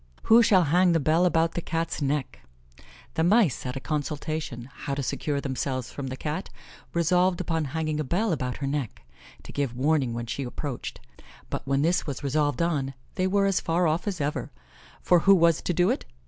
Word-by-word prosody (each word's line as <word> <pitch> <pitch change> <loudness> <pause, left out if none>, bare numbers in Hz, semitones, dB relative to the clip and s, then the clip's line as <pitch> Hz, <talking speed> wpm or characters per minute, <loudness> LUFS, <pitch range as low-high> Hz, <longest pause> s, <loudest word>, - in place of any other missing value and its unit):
"Who 230 +2 +7
shall 195 -6 +5
hang 175 +3 +3
the 165 - +3
bell 160 +4 +3
about 165 -1 +2
the 175 - -3
Cat's 165 -1 -2
neck." 140 -1 -1 0.7
The 160 - 0
mice 185 - +3
at 125 - -4
a - - -3
consultation, 150 -3 -3
how 140 0 -4
to 140 - -3
secure 145 +3 -2
themselves 130 -2 -3
from 140 -2 -5
the 130 0 -5
Cat, 155 +7 -4 0.4
resolved 180 +2 +2
upon 165 -3 -1
hanging 155 +1 -2
a - - 0
bell 185 - 0
about 125 -5 -2
her 140 - -4
neck, 135 - -3 0.4
to - - -10
give 140 -4 -2
warning 135 -3 +1
when 120 0 -3
she 120 +4 -4
approached; 130 0 -5 0.5
but - - -2
when 135 +1 +2
this 170 +1 +1
was 140 -1 -5
resolved 145 +3 +1
on, 140 -6 -1 0.2
they 185 - 0
were 200 +1 +2
as 195 -2 +2
far 170 +1 +1
off 160 +6 -1
as 190 -4 -2
ever, 145 +1 -2 0.5
for 180 - +5
who 195 +4 +6
was 170 -3 +4
to - - -1
do 175 +1 +3
it? - - -2
155 Hz, 200 wpm, -26 LUFS, 140-175 Hz, 0.7 s, Who